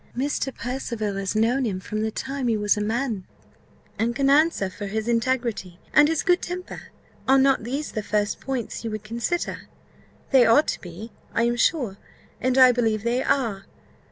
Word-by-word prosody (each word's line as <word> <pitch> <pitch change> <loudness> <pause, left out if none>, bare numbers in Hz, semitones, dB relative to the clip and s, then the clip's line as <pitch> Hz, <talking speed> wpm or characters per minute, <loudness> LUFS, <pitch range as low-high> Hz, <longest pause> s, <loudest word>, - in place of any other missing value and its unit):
Mr. 270 0 -1
Percival 235 -4 -4
has 195 +1 -3
known 235 +5 +2
him 200 -6 -2
from 215 +3 -4
the 220 - 0
time 265 +3 -4
he 225 -2 +2
was 210 0 +2
a 210 - -2
man, 220 -1 -1 0.8
and 235 +1 0
can 275 0 +2
answer 300 -8 +3
for 200 +2 -7
his 215 +2 -3
integrity 235 -6 -1 0.2
and 295 0 +7
his 320 0 0
good 360 -2 +3
temper. 360 +1 -6 0.4
Are 270 +1 +6
not 270 -3 +3
these 275 +5 -3
the 215 - -3
first 210 0 -1
points 260 -5 -4
you 230 - -3
would 215 -1 -5
consider? 235 +11 -3 0.6
They 265 -3 +7
ought 235 +7 +5
to - - -3
be, 185 +6 -9 0.2
I 230 - +3
am 240 0 +1
sure, 240 -6 +1 0.4
and 255 0 0
I 255 -1 +8
believe 225 -3 0
they 240 +2 +1
are. 220 -10 0
235 Hz, 185 wpm, -24 LUFS, 215-270 Hz, 0.8 s, I